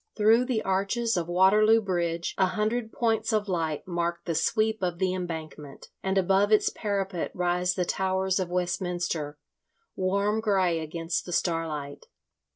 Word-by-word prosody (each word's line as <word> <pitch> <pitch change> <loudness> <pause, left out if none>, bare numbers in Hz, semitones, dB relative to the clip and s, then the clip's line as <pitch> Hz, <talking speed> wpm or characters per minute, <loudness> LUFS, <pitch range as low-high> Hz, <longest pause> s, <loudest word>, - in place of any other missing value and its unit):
Through 225 +3 +4
the 245 -4 -1
arches 200 +4 0
of 170 -2 -1
Waterloo 210 +5 +5
Bridge 170 -4 -2
a 190 - +3
hundred 220 +3 -1
points 225 -1 0
of 215 -1 0
light 165 -5 -2
mark 170 -1 -2
the 170 - -1
sweep 220 +6 +1
of 175 -2 -1
the 185 0 0
Embankment, 160 -5 -7
and 190 0 -1
above 195 +2 +3
its 215 - +4
parapet 195 -4 -2
rise 180 0 0
the 180 - 0
towers 190 +1 0
of 185 -2 -2
Westminster, 175 -4 -2 0.6
warm 200 +3 0
grey 190 -6 +2
against 165 +2 -3
the - - -6
starlight. 160 -5 -2
185 Hz, 150 wpm, -27 LUFS, 170-205 Hz, 0.6 s, Waterloo